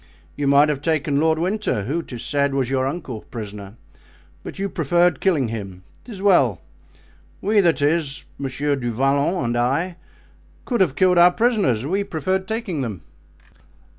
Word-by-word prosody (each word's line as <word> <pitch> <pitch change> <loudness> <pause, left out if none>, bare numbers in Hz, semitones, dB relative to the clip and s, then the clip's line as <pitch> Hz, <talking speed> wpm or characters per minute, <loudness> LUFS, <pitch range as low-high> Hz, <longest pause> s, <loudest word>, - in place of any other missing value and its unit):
You 145 -1 -2
might 140 +2 +5
have 145 -2 -2
taken 150 -3 0
Lord 160 +1 +2
Winter—who, 170 - -1
'tis 125 -7 -8
said, 140 -1 0
was 130 -2 -1
your 130 -1 +1
uncle—prisoner, 110 - -7 0.7
but - - -8
you 195 +1 -1
preferred 175 0 +1
killing 155 - +1
him; 95 -5 -7 0.2
'tis 205 -6 -9
well; 135 - +4 0.8
we, 210 +2 +2
that 170 -6 +2
is, 145 -2 0
Monsieur 140 +1 -1
du 120 -3 -3
Vallon 140 +6 +1
and 120 0 -1
I, 140 +9 0 0.7
could 240 -5 0
have 160 -8 +2
killed 180 -2 +4
our 175 +1 +8
prisoners—we 195 - +1
preferred 190 +2 -2
taking 220 -9 -3
them." 105 - -5
145 Hz, 145 wpm, -21 LUFS, 130-180 Hz, 0.8 s, our